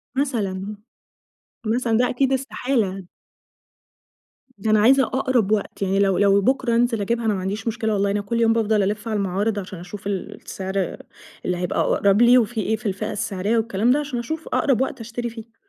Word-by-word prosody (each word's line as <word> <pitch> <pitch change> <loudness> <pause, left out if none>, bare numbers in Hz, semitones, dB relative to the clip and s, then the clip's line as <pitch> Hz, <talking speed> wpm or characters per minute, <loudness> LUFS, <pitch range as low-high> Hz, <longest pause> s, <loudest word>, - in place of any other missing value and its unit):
مثلًا. 210 -7 -2 0.9
مثلًا 230 0 +1
ده 250 +1 +2
أكيد 270 +1 +1
استحالة. 250 -7 -1 1.5
ده 215 +2 -1
أنا 215 - +5
عايزة 265 +5 +5
أقرب 255 -6 0
وقت، 210 -1 -1
يعني 195 0 +1
لو 195 -2 +3
لو 200 0 +4
بُكرة 260 +1 +1
أنزِل 235 -2 +2
أجيبها 235 +3 -1
أنا 215 - +2
ما 195 - -2
عنديش 200 +5 -4
مشكلة- 220 -1 -1
والله- 200 0 +1
أنا 205 +1 0
كل 230 +4 -2
يوم 225 0 +4
بافضل 220 -2 +2
ألِّف 210 +3 -2
على 215 -1 -1
المعارض، 200 +2 -1
عشان 185 -2 -8
أشوف 195 +3 -8
ال 195 -3 -3
السعر 190 -1 -4 0.5
اللي 180 -1 0
هيبقى 180 -1 -2
أقرب 200 +2 +3
لي 245 +1 +7
وفي 225 -1 +1
إيه 220 +1 0
في 220 - -12
الفئة 210 +2 -2
السعرية 205 +2 -1
والكلام 225 +1 +1
ده، 280 - +3
عشان 285 -4 -3
أشوف 315 +7 -5
أقرب 265 -3 +1
وقت 265 0 -2
أشتري 235 +1 -4
فيه. 225 0 -11
220 Hz, 185 wpm, -22 LUFS, 200-240 Hz, 1.5 s, لي